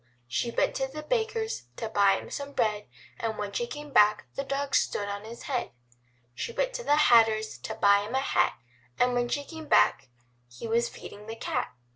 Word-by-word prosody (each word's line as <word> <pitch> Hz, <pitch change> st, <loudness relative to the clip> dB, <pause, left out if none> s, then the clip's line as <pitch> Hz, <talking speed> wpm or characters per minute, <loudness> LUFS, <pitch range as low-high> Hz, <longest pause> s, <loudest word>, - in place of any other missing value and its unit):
She 180 Hz, -, -1 dB
went -, -, +1 dB
to 265 Hz, -, 0 dB
the 305 Hz, +3 st, -8 dB
Baker's 445 Hz, -, -1 dB
to 225 Hz, -, -4 dB
buy 200 Hz, -2 st, +4 dB
him -, -, -9 dB
some 285 Hz, 0 st, -5 dB
bread, 210 Hz, -4 st, 0 dB, 0.3 s
And 225 Hz, -2 st, -2 dB
when 205 Hz, -1 st, -3 dB
she 240 Hz, +4 st, -2 dB
came 295 Hz, +2 st, -8 dB
back 210 Hz, 0 st, +5 dB
the 275 Hz, -, -3 dB
dog 275 Hz, 0 st, -3 dB
stood 205 Hz, -, +1 dB
on 200 Hz, +1 st, -5 dB
his 235 Hz, +1 st, -9 dB
head 260 Hz, -4 st, -2 dB, 0.6 s
She 470 Hz, -, -4 dB
went -, -, -1 dB
to -, -, -4 dB
the 290 Hz, -, +4 dB
Hatter's 225 Hz, -, +4 dB
to -, -, -5 dB
buy 200 Hz, 0 st, +5 dB
him 215 Hz, +5 st, -4 dB
a -, -, +3 dB
hat, 175 Hz, -9 st, +2 dB, 0.4 s
And 250 Hz, 0 st, +3 dB
when 245 Hz, 0 st, 0 dB
she 285 Hz, -, -1 dB
came 320 Hz, +1 st, -9 dB
back 130 Hz, -, +4 dB, 0.4 s
he 120 Hz, -, -8 dB
was 235 Hz, +1 st, +1 dB
feeding 210 Hz, +1 st, -11 dB
the 225 Hz, -, -5 dB
cat. 125 Hz, -, -3 dB
235 Hz, 205 wpm, -28 LUFS, 210-285 Hz, 0.6 s, back